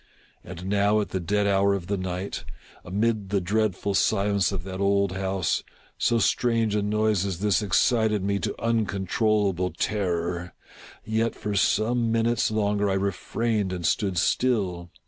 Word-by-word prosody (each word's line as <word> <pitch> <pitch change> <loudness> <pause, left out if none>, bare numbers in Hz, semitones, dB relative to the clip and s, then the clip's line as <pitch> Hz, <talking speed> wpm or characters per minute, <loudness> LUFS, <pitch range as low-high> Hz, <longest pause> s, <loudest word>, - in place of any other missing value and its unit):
And 90 0 -9
now 100 +2 +2
at 105 - -2
the 95 - -2
dead 105 +4 0
hour 100 0 +3
of 95 -3 -5
the 100 +3 -1
night, 95 0 -4 0.4
amid 105 +2 -1
the 100 0 +1
dreadful 100 +1 0
silence 100 -1 +2
of 95 -3 -4
that 95 0 -6
old 100 -1 +2
house, 95 -2 -1 0.4
so 120 - +2
strange 115 -2 +1
a 105 - +1
noise 105 -1 +1
as 95 -3 -2
this 105 0 +2
excited 105 +1 +2
me 100 0 0
to - - -4
uncontrollable 105 -3 0
terror. 90 -4 -2 0.5
Yet, 110 +1 0
for 105 - -4
some 110 +5 +1
minutes 115 0 +1
longer 105 -1 0
I - - +1
refrained 100 +2 -1
and 90 -2 -4
stood 95 +2 0
still. 90 -4 0
100 Hz, 150 wpm, -25 LUFS, 95-110 Hz, 0.5 s, hour